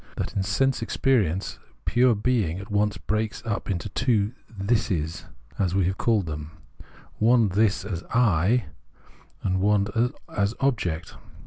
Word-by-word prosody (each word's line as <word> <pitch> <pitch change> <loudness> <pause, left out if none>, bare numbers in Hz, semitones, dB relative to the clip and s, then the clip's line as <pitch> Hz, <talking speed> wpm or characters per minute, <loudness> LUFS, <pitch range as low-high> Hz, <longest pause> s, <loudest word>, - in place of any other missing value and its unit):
that - - -3
in 100 - +1
sense 130 +8 +1
experi 115 - +2
ence 95 +4 -5 0.3
pure 125 -1 +4
being 105 -6 0
at 100 +2 -8
once 105 -1 +1
breaks 110 +2 -2
up 105 -2 -3
into 90 -4 -2
the - - -13
two 115 -4 +1
" - - -25
thises," 95 -6 -1 0.3
as 95 -2 +1
we 95 -2 +3
have 95 +1 -1
called 110 -5 +2
them, 75 -1 -5 0.7
one 115 -1 +4
this 100 +1 +1
as 90 -5 -4
I, 110 -1 +2 0.8
and 95 -1 +1
one 105 +4 +2 0.2
as 100 +2 +1
object. 90 - -1
105 Hz, 150 wpm, -25 LUFS, 95-115 Hz, 0.8 s, pure